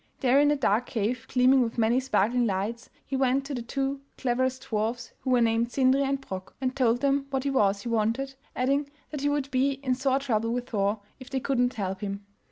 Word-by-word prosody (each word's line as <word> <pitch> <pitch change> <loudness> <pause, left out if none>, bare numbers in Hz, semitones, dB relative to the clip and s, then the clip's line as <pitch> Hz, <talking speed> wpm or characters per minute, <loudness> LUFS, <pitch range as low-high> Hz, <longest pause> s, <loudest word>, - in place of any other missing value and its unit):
There 265 0 +4
in 290 0 +5
a 295 - +3
dark 245 -3 +1
cave 230 +2 -2
gleaming 255 +1 +5
with 235 -1 -2
many 230 +2 +3
sparkling 240 -1 +1
lights 210 +4 -3 0.2
he 270 - -3
went 265 +1 +2
to 280 - -5
the 245 - -3
two 270 +3 -2 0.2
cleverest 260 +1 0
dwarfs 225 +3 -2
who 265 - -4
were 250 -1 +4
named 230 +1 +2
Sindri 265 +1 +3
and 275 0 0
Brok, 190 -8 -8
and 260 0 -1
told 245 -2 +2
them 275 0 +1
what 265 0 -2
it 280 - +1
was 200 -6 +2
he 240 - -4
wanted, 230 +5 0 0.2
adding 275 +3 +1 0.2
that 295 -2 -4
he 290 - +1
would 285 -1 -1
be 270 +2 +2
in 255 -1 +1
sore 265 +1 +1
trouble 230 -5 0
with 245 +1 -3
Thor 205 0 0 0.2
if 260 -1 -11
they 265 - -1
could 265 -1 -1
not 245 +1 +2
help 190 -2 -3
him. 200 0 -4
250 Hz, 225 wpm, -27 LUFS, 225-270 Hz, 0.2 s, in